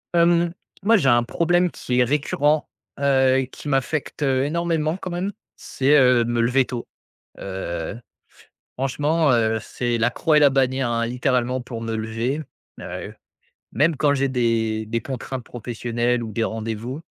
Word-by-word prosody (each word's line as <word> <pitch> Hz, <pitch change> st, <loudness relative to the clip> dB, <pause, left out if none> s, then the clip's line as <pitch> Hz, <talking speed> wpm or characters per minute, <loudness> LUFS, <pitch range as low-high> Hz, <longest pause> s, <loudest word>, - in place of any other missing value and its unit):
Hem, 170 Hz, 0 st, +3 dB, 0.3 s
moi, 225 Hz, +3 st, +5 dB
j'ai 140 Hz, -8 st, +2 dB
un 120 Hz, -1 st, +4 dB
problème 175 Hz, +7 st, +1 dB
qui 125 Hz, 0 st, -3 dB
est -, -, +6 dB
récurrent, 145 Hz, +3 st, +1 dB, 0.3 s
heu, 135 Hz, -1 st, +3 dB
qui -, -, -10 dB
m'affecte 140 Hz, +2 st, -1 dB
énormément 155 Hz, +4 st, 0 dB
quand 190 Hz, -, -6 dB
même, 180 Hz, +3 st, -2 dB, 0.2 s
c'est, 140 Hz, +3 st, +2 dB
heu, 125 Hz, -2 st, +5 dB
me 120 Hz, 0 st, -1 dB
lever 125 Hz, +3 st, +3 dB
tôt, 120 Hz, -2 st, -6 dB, 0.5 s
heu, 95 Hz, -1 st, -5 dB, 0.8 s
franchement, 145 Hz, +4 st, +1 dB
heu, 110 Hz, -1 st, +2 dB
c'est 120 Hz, +2 st, -2 dB
la 115 Hz, +1 st, +2 dB
croix 155 Hz, +5 st, +2 dB
et -, -, +7 dB
la 145 Hz, -1 st, +6 dB
bannière, 130 Hz, -1 st, +1 dB
hein, 115 Hz, 0 st, 0 dB
littéralement 125 Hz, +1 st, 0 dB
pour 120 Hz, -2 st, -7 dB
me 115 Hz, 0 st, -3 dB
lever, 115 Hz, +6 st, -2 dB, 0.4 s
heu, -, -, -7 dB, 0.6 s
même 155 Hz, +2 st, +2 dB
quand 145 Hz, +1 st, +3 dB
j'ai 140 Hz, 0 st, +1 dB
des 115 Hz, -3 st, 0 dB
des 115 Hz, +2 st, -2 dB
contraintes 130 Hz, -1 st, -5 dB
professionnelles 120 Hz, +1 st, -2 dB
ou 110 Hz, -, -7 dB
des 115 Hz, -, -1 dB
rendez-vous, 115 Hz, +5 st, -4 dB
130 Hz, 155 wpm, -22 LUFS, 115-145 Hz, 0.8 s, et